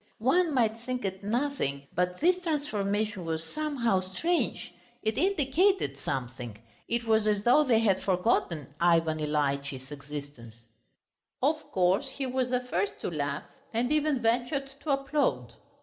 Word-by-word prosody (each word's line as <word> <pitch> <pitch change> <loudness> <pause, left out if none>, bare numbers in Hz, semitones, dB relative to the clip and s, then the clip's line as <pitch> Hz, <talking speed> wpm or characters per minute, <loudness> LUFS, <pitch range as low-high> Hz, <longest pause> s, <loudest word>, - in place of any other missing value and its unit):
One 305 +7 +2
might 225 -3 +2
think 250 -1 -4
it 190 0 -4
nothing, 225 - -1
but 180 0 0
this 360 +3 +4
transformation 215 - -1
was 160 -1 -2
somehow 250 - 0
strange; 190 - -1 0.3
it 220 -1 0
indicated 360 - +2
something. 125 -5 -4 0.3
It 235 0 0
was 220 -1 +2
as 205 -1 +2
though 250 +6 +6
they 250 -6 +3
had 195 -4 +3
forgotten 180 - 0
Ivan 165 -2 +3
Ilyitch's 140 -2 -1
existence. 140 -6 -9 0.8
Of 305 +3 +3
course 185 +1 +2
he 275 - -1
was 255 -1 0
the 250 0 +1
first 200 -6 -2
to - - -2
laugh, 145 -2 -2 0.3
and 245 +3 +1
even 300 -4 +2
ventured 245 +4 +1
to 310 - -7
applaud. 275 - 0
215 Hz, 140 wpm, -29 LUFS, -, 0.8 s, though